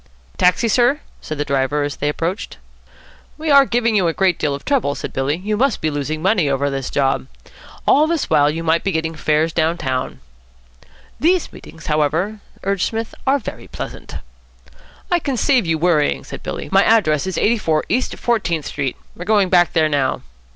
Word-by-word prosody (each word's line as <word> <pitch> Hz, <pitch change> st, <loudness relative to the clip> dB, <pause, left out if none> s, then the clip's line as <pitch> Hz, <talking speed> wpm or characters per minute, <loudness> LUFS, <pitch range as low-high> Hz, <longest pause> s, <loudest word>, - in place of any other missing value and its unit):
"Taxi, 180 Hz, +6 st, +3 dB
sir?" 245 Hz, +6 st, +3 dB, 0.2 s
said 155 Hz, -, -6 dB
the 145 Hz, -, -1 dB
driver, 140 Hz, +1 st, 0 dB
as 145 Hz, 0 st, -4 dB
they 145 Hz, -, -1 dB
approached. 170 Hz, +7 st, -3 dB, 0.8 s
"We 315 Hz, 0 st, -1 dB
are 280 Hz, -1 st, +7 dB
giving 235 Hz, -2 st, +1 dB
you 190 Hz, -4 st, +3 dB
a 165 Hz, -, 0 dB
great 185 Hz, -2 st, +1 dB
deal 145 Hz, -2 st, 0 dB
of 140 Hz, -, -10 dB
trouble," 255 Hz, -, +1 dB
said -, -, -6 dB
Billy. 135 Hz, +3 st, 0 dB
"You 210 Hz, +4 st, -2 dB
must 260 Hz, 0 st, +1 dB
be 155 Hz, -, -1 dB
losing 150 Hz, +2 st, -3 dB
money 190 Hz, -6 st, +2 dB
over 140 Hz, +1 st, 0 dB
this 135 Hz, -1 st, -3 dB
job. 135 Hz, -, 0 dB, 0.6 s
All 300 Hz, +3 st, +4 dB
this 330 Hz, -2 st, -1 dB
while 145 Hz, 0 st, +4 dB
you 165 Hz, +2 st, -3 dB
might 165 Hz, 0 st, +1 dB
be 195 Hz, -, 0 dB
getting 160 Hz, 0 st, -1 dB
fares 155 Hz, +1 st, 0 dB
down 165 Hz, +1 st, +1 dB
town." 130 Hz, -5 st, -3 dB, 1.0 s
"These 350 Hz, +2 st, +1 dB
meetings, 160 Hz, -2 st, -13 dB
however," 160 Hz, +8 st, 0 dB, 0.2 s
urged 195 Hz, -2 st, 0 dB
Psmith, 225 Hz, 0 st, -4 dB
"are 275 Hz, +2 st, +4 dB
very 255 Hz, -, -8 dB
pleasant." -, -, -8 dB, 1.0 s
"I 350 Hz, -, +3 dB
can 275 Hz, -5 st, -2 dB
save 250 Hz, -, +2 dB
you 165 Hz, -1 st, +1 dB
worrying," 155 Hz, -3 st, +1 dB
said -, -, -9 dB
Billy. -, -, -5 dB
"My 195 Hz, +1 st, +5 dB
address 180 Hz, -8 st, +3 dB
is 190 Hz, -, -3 dB
84 190 Hz, -9 st, +1 dB
East 255 Hz, +2 st, -1 dB
Fourteenth 175 Hz, -10 st, 0 dB
Street. 140 Hz, -3 st, -3 dB, 0.2 s
We -, -, -13 dB
are -, -, -4 dB
going 205 Hz, -2 st, +3 dB
back 175 Hz, -1 st, +4 dB
there 160 Hz, -2 st, +3 dB
now." 140 Hz, -3 st, 0 dB
170 Hz, 190 wpm, -19 LUFS, 150-220 Hz, 1.0 s, are